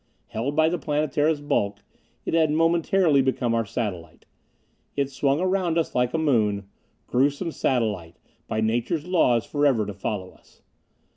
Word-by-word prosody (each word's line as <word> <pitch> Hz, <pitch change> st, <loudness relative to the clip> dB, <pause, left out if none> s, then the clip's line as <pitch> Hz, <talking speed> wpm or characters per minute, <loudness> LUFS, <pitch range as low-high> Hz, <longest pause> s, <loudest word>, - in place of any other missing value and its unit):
Held 130 Hz, +7 st, -3 dB
by 155 Hz, 0 st, +4 dB
the 175 Hz, +1 st, -1 dB
Planetara's 150 Hz, 0 st, 0 dB
bulk, 100 Hz, -7 st, -1 dB, 0.4 s
it -, -, -3 dB
had 160 Hz, -2 st, +3 dB
momentarily 165 Hz, -1 st, +3 dB
become 130 Hz, -3 st, 0 dB
our 115 Hz, -2 st, 0 dB
satellite. 90 Hz, -8 st, -5 dB, 0.7 s
It 140 Hz, -1 st, -1 dB
swung 140 Hz, +2 st, +1 dB
around 185 Hz, -2 st, +1 dB
us 165 Hz, -, 0 dB
like 125 Hz, 0 st, +1 dB
a -, -, +2 dB
moon. 110 Hz, -10 st, +1 dB, 0.4 s
Gruesome 145 Hz, +6 st, +1 dB
satellite, 105 Hz, -, -1 dB, 0.3 s
by 110 Hz, -, -1 dB
nature's 120 Hz, +8 st, 0 dB
laws 140 Hz, -11 st, +2 dB
forever 140 Hz, -7 st, +2 dB
to 105 Hz, -, -5 dB
follow 95 Hz, -1 st, -4 dB
us. -, -, -25 dB
135 Hz, 145 wpm, -24 LUFS, 110-160 Hz, 0.7 s, by